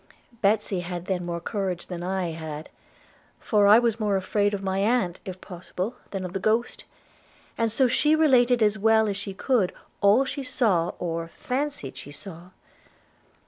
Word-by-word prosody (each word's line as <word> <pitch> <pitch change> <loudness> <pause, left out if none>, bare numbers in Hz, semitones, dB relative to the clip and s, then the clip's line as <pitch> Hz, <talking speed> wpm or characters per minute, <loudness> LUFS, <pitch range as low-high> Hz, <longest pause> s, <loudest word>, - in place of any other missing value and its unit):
Betsy 205 -2 +2
had 175 0 -5
then 185 -2 -1
more 170 0 -2
courage 185 -1 -3
than 175 -2 -6
I 185 -1 -2
had; 160 -1 -7 0.7
for 210 -3 +3
I 210 +2 +9
was 235 -2 +1
more 210 -2 +1
afraid 205 +2 +1
of 195 - -6
my 190 0 -1
aunt, 200 -4 +1
if 185 -1 -7
possible, 185 +4 -5
than 195 -2 -4
of 180 - -6
the 195 - -2
ghost, 220 +4 0 0.7
and 230 -1 0
so 260 +4 +3
she 300 +5 +3
related 250 -6 +4
as 215 0 +2
well 220 +1 +4
as 200 - -1
she 200 -1 -6
could 225 -5 +1 0.3
all 210 +6 +5
she 280 - -4
saw, 215 -10 +1
or 165 -1 -3
fancied 250 - -4
she 130 - -9
saw. 175 +2 -11
200 Hz, 170 wpm, -25 LUFS, 180-230 Hz, 0.7 s, I